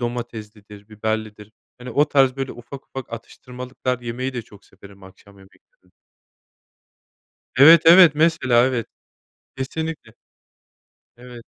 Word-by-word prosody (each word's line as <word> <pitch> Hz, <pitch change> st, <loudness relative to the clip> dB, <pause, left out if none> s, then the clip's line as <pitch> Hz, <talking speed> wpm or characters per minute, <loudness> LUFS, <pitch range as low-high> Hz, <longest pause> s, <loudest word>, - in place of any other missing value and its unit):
domateslidir 110 Hz, -4 st, -8 dB
biberlidir 110 Hz, -1 st, -5 dB, 0.3 s
hani 125 Hz, +1 st, -9 dB
o 145 Hz, -, +2 dB
tarz 135 Hz, -3 st, +2 dB
böyle 135 Hz, -1 st, -5 dB
ufak 125 Hz, +3 st, -12 dB
ufak 135 Hz, -3 st, -9 dB
atıştırmalıklar 125 Hz, +2 st, -7 dB
yemeyi 125 Hz, +2 st, -5 dB
de 120 Hz, -, -4 dB
çok 105 Hz, -2 st, -19 dB
severim 100 Hz, 0 st, -18 dB
akşam 95 Hz, +1 st, -18 dB
yemeklerin 95 Hz, -1 st, -25 dB, 1.7 s
Evet, 160 Hz, +4 st, +8 dB
evet, 170 Hz, -2 st, +7 dB
mesela, 130 Hz, -6 st, +2 dB
evet. 125 Hz, -4 st, -3 dB, 0.7 s
Kesinlikle. 150 Hz, -2 st, -6 dB, 1.0 s
Evet. 120 Hz, -1 st, -13 dB
120 Hz, 110 wpm, -21 LUFS, 110-135 Hz, 1.7 s, Evet